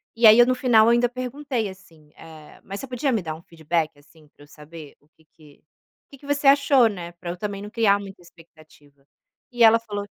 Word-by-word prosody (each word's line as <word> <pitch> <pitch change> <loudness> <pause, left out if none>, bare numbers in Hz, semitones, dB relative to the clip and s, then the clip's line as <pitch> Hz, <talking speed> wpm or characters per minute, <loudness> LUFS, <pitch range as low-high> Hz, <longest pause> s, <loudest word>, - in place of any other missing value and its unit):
e 230 0 +5
aí 215 +1 +8
eu 240 - +7
no 255 - +1
final 240 -4 +3
eu - - +4
ainda 240 +1 +2
perguntei 255 -1 -5
assim, 165 -6 -16
eh, 160 -2 -15
"Mas 195 +1 -8
você - - -7
podia 255 +2 -2
me 220 -6 -2
dar 160 -1 -5
um 160 - -14
feedback, 160 -2 -4
assim, 150 +2 -23
para 145 - -21
eu - - -19
saber 150 0 -14
o 145 - -33
que 160 -1 -31
que 150 -3 -21 0.5
que 275 - -14
que 280 - -16
você 285 0 -2
achou, 275 -2 +4
né, 180 -5 -7
para 175 0 -8
eu 180 - -8
também 200 +1 -6
não 210 - -10
criar 215 -3 +2
muita 195 -2 -12
expectativa". 155 -4 -22 0.5
E 240 -1 +1
ela 225 0 +6
falou 205 -3 -7
200 Hz, 230 wpm, -22 LUFS, 160-240 Hz, 0.5 s, aí